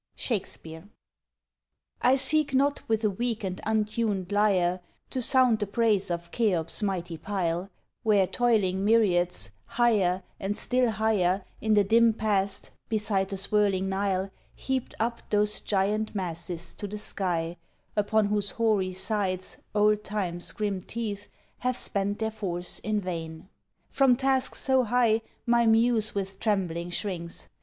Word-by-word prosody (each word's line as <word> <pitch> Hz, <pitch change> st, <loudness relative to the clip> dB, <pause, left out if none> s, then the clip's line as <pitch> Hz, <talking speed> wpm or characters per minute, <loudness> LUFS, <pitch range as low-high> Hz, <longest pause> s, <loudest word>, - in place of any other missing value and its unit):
SHAKESPEARE. 185 Hz, -5 st, -4 dB, 1.1 s
I 255 Hz, +2 st, +5 dB
seek 295 Hz, 0 st, +3 dB
not 280 Hz, +2 st, +2 dB
with 220 Hz, 0 st, +1 dB
a 215 Hz, -, +3 dB
weak 230 Hz, +2 st, -2 dB
and 185 Hz, -1 st, -4 dB
untuned 215 Hz, -3 st, 0 dB
lyre 190 Hz, -4 st, +2 dB, 0.3 s
To 255 Hz, -, -1 dB
sound 250 Hz, -3 st, +4 dB
the 205 Hz, -, -1 dB
praise 210 Hz, -2 st, +1 dB
of 170 Hz, 0 st, -4 dB
Cheop's 190 Hz, -8 st, 0 dB
mighty 175 Hz, -5 st, -2 dB
pile, 180 Hz, -1 st, -2 dB, 0.3 s
Where 205 Hz, -3 st, +4 dB
toiling 200 Hz, -4 st, +1 dB
myriads, 180 Hz, -, +2 dB, 0.3 s
higher 195 Hz, -6 st, +3 dB, 0.2 s
and 200 Hz, +2 st, -2 dB
still 250 Hz, -1 st, +1 dB
higher, 205 Hz, -4 st, +1 dB, 0.2 s
In 220 Hz, -1 st, +2 dB
the 205 Hz, -, +5 dB
dim 225 Hz, +3 st, +4 dB
past, 200 Hz, -3 st, -1 dB, 0.2 s
beside 210 Hz, -3 st, 0 dB
the 195 Hz, -, -2 dB
swirling 195 Hz, -1 st, +1 dB
Nile, 195 Hz, 0 st, -1 dB, 0.2 s
Heaped 265 Hz, -2 st, -3 dB
up 235 Hz, +1 st, -1 dB
those 210 Hz, 0 st, +2 dB
giant 210 Hz, +2 st, 0 dB
masses 175 Hz, -2 st, -4 dB
to 205 Hz, -, -6 dB
the 210 Hz, +1 st, -6 dB
sky, 175 Hz, -5 st, -2 dB, 0.4 s
Upon 215 Hz, +1 st, +2 dB
whose 205 Hz, -1 st, 0 dB
hoary 210 Hz, -5 st, +1 dB
sides 190 Hz, -1 st, -2 dB, 0.2 s
old 210 Hz, 0 st, +3 dB
Time's 185 Hz, -5 st, -2 dB
grim 205 Hz, -3 st, -2 dB
teeth 210 Hz, -1 st, -5 dB, 0.3 s
Have 250 Hz, 0 st, 0 dB
spent 200 Hz, +1 st, -1 dB
their 220 Hz, 0 st, -1 dB
force 180 Hz, -5 st, -4 dB
in 215 Hz, -1 st, -1 dB
vain. 165 Hz, -1 st, -6 dB, 0.4 s
From 270 Hz, -3 st, +4 dB
task 265 Hz, 0 st, +1 dB
so 265 Hz, -1 st, +2 dB
high 230 Hz, -1 st, +2 dB, 0.2 s
My 235 Hz, -1 st, +3 dB
muse 225 Hz, -1 st, +3 dB
with 195 Hz, -1 st, -4 dB
trembling 180 Hz, -5 st, -1 dB
shrinks. 175 Hz, -2 st, -4 dB
205 Hz, 140 wpm, -27 LUFS, 185-225 Hz, 1.1 s, I